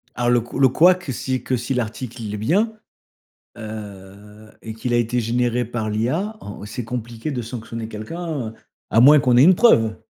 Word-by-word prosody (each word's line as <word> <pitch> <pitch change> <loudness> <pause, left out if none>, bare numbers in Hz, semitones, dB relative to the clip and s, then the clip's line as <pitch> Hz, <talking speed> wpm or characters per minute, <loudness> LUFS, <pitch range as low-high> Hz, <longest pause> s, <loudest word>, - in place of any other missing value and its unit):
Ah 120 0 -1
le 120 -1 +3
cou 120 +3 -7
le 135 - +6
couac, 180 +7 +4
que 135 - -3
si 130 +1 -3
que 130 - 0
si 125 +2 -3
l'article, 120 0 -4
il 105 -1 -5
est 105 - -3
bien, 195 - +1 0.8
heu 105 -1 -10
et 110 - -7
qu'il 120 +2 -3
a - - +4
été 120 +1 0
généré 120 +1 0
par 110 -2 -4
l'IA, 130 - -1
en 105 0 -9
c'est 120 +4 -6
compliqué 115 +2 -5
de 125 - -3
sanctionner 115 -1 -6
quelqu'un, 140 +4 -5
heu, - - -13 0.4
à 115 - +3
moins 145 +4 +8
qu'on 125 -3 +3
ait 125 - +7
une 180 +5 +7
preuve. 115 - +4
120 Hz, 200 wpm, -21 LUFS, 110-130 Hz, 0.8 s, moins